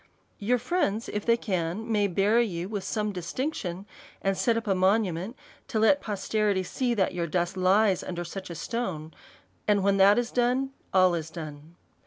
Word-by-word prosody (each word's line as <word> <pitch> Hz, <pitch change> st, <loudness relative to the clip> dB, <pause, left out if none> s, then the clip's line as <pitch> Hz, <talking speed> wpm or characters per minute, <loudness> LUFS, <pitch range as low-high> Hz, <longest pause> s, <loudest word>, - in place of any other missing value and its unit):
Your 240 Hz, +5 st, +2 dB
friends, 240 Hz, -, -1 dB
if 210 Hz, +2 st, -4 dB
they 230 Hz, 0 st, +5 dB
can, 190 Hz, +2 st, -2 dB
may 205 Hz, -2 st, +3 dB
bury 210 Hz, +6 st, +3 dB
you 175 Hz, -2 st, -4 dB
with 205 Hz, -2 st, -4 dB
some 210 Hz, -1 st, -1 dB
distinction, 185 Hz, -, -4 dB, 0.4 s
and 195 Hz, 0 st, +1 dB
set 230 Hz, +3 st, +1 dB
up 230 Hz, -, -3 dB
a 200 Hz, -, +2 dB
monument 190 Hz, +1 st, +1 dB, 0.3 s
to -, -, -2 dB
let 225 Hz, +7 st, +4 dB
posterity 205 Hz, -1 st, 0 dB
see 240 Hz, +6 st, -1 dB
that 190 Hz, -4 st, +1 dB
your 170 Hz, -1 st, -2 dB
dust 175 Hz, +3 st, -1 dB
lies 190 Hz, +1 st, +3 dB
under 175 Hz, -1 st, -5 dB
such 190 Hz, +2 st, -7 dB
a 170 Hz, -, -6 dB
stone; 165 Hz, -7 st, -4 dB, 0.5 s
and 205 Hz, -2 st, +3 dB
when 200 Hz, 0 st, +3 dB
that 195 Hz, +2 st, +6 dB
is 240 Hz, -1 st, 0 dB
done, 250 Hz, +2 st, +1 dB, 0.2 s
all 185 Hz, -1 st, +5 dB
is 165 Hz, -2 st, -3 dB
done. 155 Hz, -1 st, -9 dB
200 Hz, 180 wpm, -27 LUFS, 180-225 Hz, 0.5 s, that